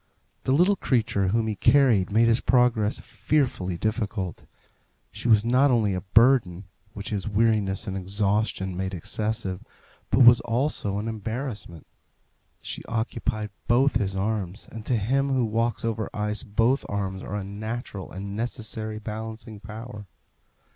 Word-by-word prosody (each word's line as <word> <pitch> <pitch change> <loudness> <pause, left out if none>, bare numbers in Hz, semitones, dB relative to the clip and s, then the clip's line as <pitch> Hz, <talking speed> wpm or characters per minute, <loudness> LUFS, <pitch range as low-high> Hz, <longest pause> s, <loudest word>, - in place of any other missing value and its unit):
The - - +1
little 180 +8 +4
creature 115 - +1
whom 110 +4 +1
he 110 - -1
carried 120 -4 +4
made 115 +3 +4
his 115 +1 +3
progress 120 -4 +2
fearfully 120 - -1
difficult. 105 -4 -3 0.6
She - - -5
was 110 -2 +5
not 130 +4 +4
only 110 -6 +2
a 90 - -2
burden, 110 -3 +3 0.3
which 100 0 -7
his 105 -1 -2
weariness 105 -2 +1
and 95 -3 -4
exhaustion 100 0 -1
made 95 +1 -3
excessive, 105 +1 -3 0.5
but 120 - +3
was 120 0 +9
also 120 -4 -1
an 105 +2 -3
embarrassment. 110 - -5 0.8
She - - -5
occupied 110 -1 -2 0.2
both 130 +2 +4
his 100 -4 -2
arms, 100 -1 -3
and 110 -1 -8
to 125 - +2
him 135 +7 +1
who 130 -2 +2
walks 115 +1 -1
over 110 -2 -2
ice 105 0 0
both 115 +4 +1
arms 95 -2 -3
are 100 - -5
a 105 - -3
natural 105 0 -6
and 100 +1 -6
necessary 110 -1 -4
balancing 110 0 -7
power. 105 0 -9
110 Hz, 145 wpm, -25 LUFS, 100-120 Hz, 0.8 s, was